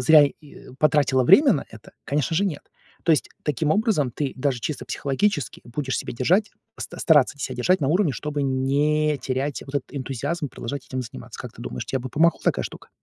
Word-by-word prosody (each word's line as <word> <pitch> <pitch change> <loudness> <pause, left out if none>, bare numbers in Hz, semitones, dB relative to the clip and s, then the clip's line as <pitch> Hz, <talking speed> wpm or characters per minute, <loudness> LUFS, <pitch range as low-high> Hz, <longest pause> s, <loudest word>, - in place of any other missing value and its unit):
зря 150 +3 +7
и 145 +1 -12
потратила 140 -4 +3
время 265 - +7
на 140 - -2
это? 110 -1 -14
Конечно 150 +3 0
же, 200 - +2
нет. 165 -8 -3 0.4
То 165 - +4
есть 135 -8 +1
таким 150 +1 0
образом, 200 - +2
ты 140 +2 -3
даже 130 -2 0
чисто 155 - -4
психологически 145 - -1
будешь 130 +2 -3
себя - - -4
держать, 180 - +2 0.3
ста - - -7
стараться 145 -3 +4
ся 130 -2 -4
держать 165 +9 +2
на 135 - +1
уровне, 175 -3 +2
чтобы 150 0 -3
не 145 +3 +1
терять 135 +2 -2
вот 140 +1 -3
этот 135 - -3
энтузиазм 140 +4 -3
продолжать 130 +3 -6
этим 130 - -3
заниматься. 90 - -9
Как - - -8
ты - - -11
думаешь, 65 - -5
тебе 130 - -2
бы 130 - -5
помогла 165 +1 +3
такая - - +1
штука? - - -9
145 Hz, 200 wpm, -24 LUFS, 130-155 Hz, 0.4 s, зря